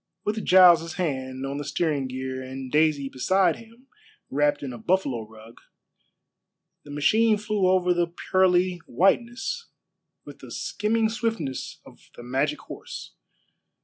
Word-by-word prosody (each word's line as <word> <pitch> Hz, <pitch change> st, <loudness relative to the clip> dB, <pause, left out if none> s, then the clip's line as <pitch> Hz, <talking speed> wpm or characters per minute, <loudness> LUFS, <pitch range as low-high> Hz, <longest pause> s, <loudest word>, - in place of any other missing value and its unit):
With 210 Hz, +1 st, -2 dB
Giles' 170 Hz, -3 st, +6 dB
hand 130 Hz, -6 st, -3 dB
on 140 Hz, +1 st, -4 dB
the 145 Hz, -, -4 dB
steering 145 Hz, -2 st, -1 dB
gear 130 Hz, 0 st, -5 dB
and 130 Hz, 0 st, -7 dB
Daisy 150 Hz, -2 st, +2 dB
beside 175 Hz, +7 st, +1 dB
him 230 Hz, +3 st, -17 dB, 0.5 s
wrapped 145 Hz, +1 st, +1 dB
in 130 Hz, -3 st, -5 dB
a 120 Hz, -, -9 dB
buffalo 135 Hz, -, 0 dB
rug, 110 Hz, +1 st, -15 dB, 1.2 s
the -, -, -15 dB
machine 215 Hz, +10 st, +3 dB
flew 210 Hz, -2 st, 0 dB
over 180 Hz, -1 st, +3 dB
the 175 Hz, 0 st, +1 dB
pearly 180 Hz, +1 st, +1 dB
whiteness 240 Hz, -, 0 dB, 0.6 s
with -, -, -11 dB
the -, -, -12 dB
skimming 220 Hz, +1 st, 0 dB
swiftness 225 Hz, -, -3 dB
of -, -, -18 dB
the 120 Hz, -, -10 dB
magic 135 Hz, +5 st, -1 dB
horse. -, -, -9 dB
165 Hz, 135 wpm, -25 LUFS, 135-195 Hz, 1.2 s, Giles